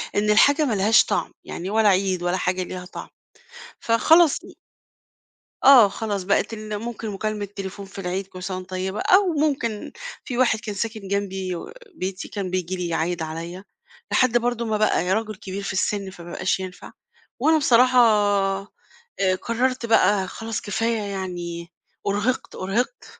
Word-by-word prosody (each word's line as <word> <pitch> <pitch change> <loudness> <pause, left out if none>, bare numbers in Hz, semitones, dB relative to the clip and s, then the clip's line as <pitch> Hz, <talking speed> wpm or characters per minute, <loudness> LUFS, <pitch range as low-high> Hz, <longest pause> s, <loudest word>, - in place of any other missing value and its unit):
إن 210 +1 +1
الحاجة 285 +8 +5
ما 250 - 0
لهاش 210 +2 +5
طعم - - -1
يعني، 180 +3 -6
ولا 215 0 +4
عيد 190 -2 +1
ولا 175 +1 0
حاجة 185 0 -1
ليها 180 0 -7
طعم، 180 - -9 0.7
فخلاص 315 +8 +4 1.3
آه، 255 -6 +9
خلاص 200 -1 -3
بقت 200 +4 +1
ال 215 -1 -5
ممكن 230 0 -5
مكالمة 210 +1 -3
التليفون 200 0 -7
في 195 +1 -11
العيد، 185 +1 -3
"كل 185 -1 -10
سنة 185 -1 -3
وأنتِ 185 0 -9
طيبة"، 190 +2 -3
أو 375 -2 +4
ممكن 275 -8 -1 0.3
في 245 -3 -4
واحد 235 -4 +3
كان 210 -2 -6
ساكن 215 0 -4
جنبي 190 -2 -2 0.4
بيتي، 190 -3 -4
كان 200 -3 -4
بييجي 185 0 -2
لي 180 -1 -3
يعيّد 170 +1 -1
عليّا، 165 +4 -6 0.5
لحد 250 -2 +4
برضه 240 0 -1
ما 220 -1 0
بقى 210 -3 +1
راجل 215 0 -2
كبير 195 +1 -6
في 195 - -3
السن، 200 0 -1
فما 175 -2 -11
بقاش 185 +1 0
ينفع، 185 -1 -8 0.5
وأنا 315 +4 +4
بصراحة، 255 -3 +5 1.2
آآ، 185 -1 +3
قررت 250 +1 -1
بقى 205 -4 +3
خلاص، 225 +3 -5
كفاية 225 +2 -1
يعني، 180 -4 -5 0.4
أُرهقت، 210 +6 -1
أُرهقت، 230 - -2
200 Hz, 155 wpm, -23 LUFS, 185-230 Hz, 1.3 s, آه